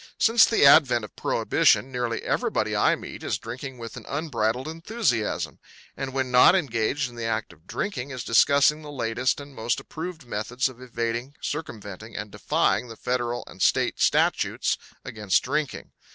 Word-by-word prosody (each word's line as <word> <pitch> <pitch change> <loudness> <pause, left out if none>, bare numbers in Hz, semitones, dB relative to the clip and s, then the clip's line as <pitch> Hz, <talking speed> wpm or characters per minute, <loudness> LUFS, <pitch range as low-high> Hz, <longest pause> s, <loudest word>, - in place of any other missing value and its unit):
Since 230 0 +6
the 225 - +3
advent 130 -6 +6
of - - -15
Prohibition 135 - +2
nearly 120 -2 -2
everybody - - 0
I - - +3
meet - - -9
is - - -1
drinking 130 +1 -7
with 115 -2 -8
an - - -10
unbridled 130 -4 -1
enthusiasm; 165 - -2 0.4
and 135 -1 -4
when 130 -1 -2
not 125 +8 +7
engaged 135 -4 0
in 120 - -13
the 115 -1 -4
act 110 -1 -2
of 80 +4 -25
drinking 140 -10 -3
is 130 -3 -5
discussing 140 +6 +4
the 150 - -10
latest 125 -1 -1
and 140 0 -10
most 115 -1 -1
approved 160 -2 -7
methods 120 +3 -1
of 130 -1 -11
evading, 120 +2 -3
circumventing 110 - -6
and 105 0 -5
defying 125 - 0
the 115 -1 -10
Federal 120 -1 -2
and - - -12
State - - +2
statutes - - +2 0.3
against 105 -3 0
drinking. 145 +2 -3
125 Hz, 165 wpm, -25 LUFS, 115-145 Hz, 0.4 s, not